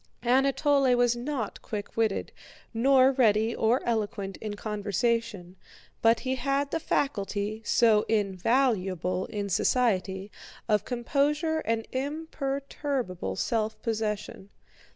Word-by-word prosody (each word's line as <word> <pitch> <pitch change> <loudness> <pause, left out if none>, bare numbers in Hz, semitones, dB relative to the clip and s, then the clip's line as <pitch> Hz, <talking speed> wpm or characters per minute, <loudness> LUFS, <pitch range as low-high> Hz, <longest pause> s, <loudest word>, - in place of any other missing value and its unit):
Anatole 270 +1 +3
was 245 -1 +3
not 245 -2 -4
quick 205 -2 -6
witted, 220 -3 0 0.4
nor 260 +3 +5
ready 225 -3 +2
or 230 +4 +2
eloquent 210 -4 -2
in 215 -1 -5
conversation, 210 -2 -2 0.4
but 230 0 +4
he 260 0 -2
had 275 +2 0
the 325 - 0
faculty, 215 -8 -1
so 220 -1 +4
invaluable 195 - +1
in 205 -1 -4
society, 195 -2 0 0.4
of 210 -2 +2
composure 290 +6 0
and 225 0 -1
imperturbable 275 - -3
self 220 - -1
possession. 210 -3 -3
230 Hz, 105 wpm, -28 LUFS, 205-265 Hz, 0.4 s, nor